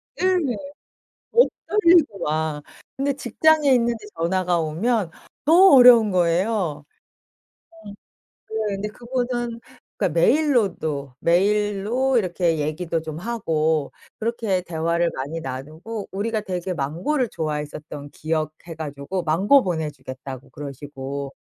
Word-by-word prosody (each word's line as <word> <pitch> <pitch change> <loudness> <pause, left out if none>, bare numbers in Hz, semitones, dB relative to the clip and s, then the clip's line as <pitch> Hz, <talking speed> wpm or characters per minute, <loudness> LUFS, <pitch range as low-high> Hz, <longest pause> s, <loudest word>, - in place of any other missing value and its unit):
네네. 360 -9 +1 0.8
더 470 - +5 0.3
떨리고 340 - +4
막. 155 -1 -1 0.3
그런데 275 +1 0
직장에 300 +4 +3
있는데 235 -3 +1
전화가 175 +1 +1
오면 180 +5 0 0.3
너무 340 +2 +7
어려운 240 -4 +8
거예요. 175 -3 0 1.0
음. - - -7 0.6
예 - - -3 0.2
근데 200 +2 -3
그분은 240 0 -3 0.4
그러니까 170 -2 0
메일로도 195 - +1
메일로 210 +7 +1
이렇게 175 -5 0
얘기도 160 +3 -2
좀 155 -1 -6
하고 160 - -1 0.3
그렇게 220 -5 -1
대화를 170 0 0
많이 145 +5 -4
나누고 155 - -6
우리가 215 +3 -2
되게 185 -2 -4
망고를 180 - -1
좋아했었던 150 -1 -5
기억해 155 +2 -4
가지고 150 +4 -4
'망고 190 - +4
보내 160 -4 -2
주겠다.'고 130 0 -9
그러시고 140 0 -7
180 Hz, 275 characters per minute, -23 LUFS, 155-235 Hz, 1.0 s, 어려운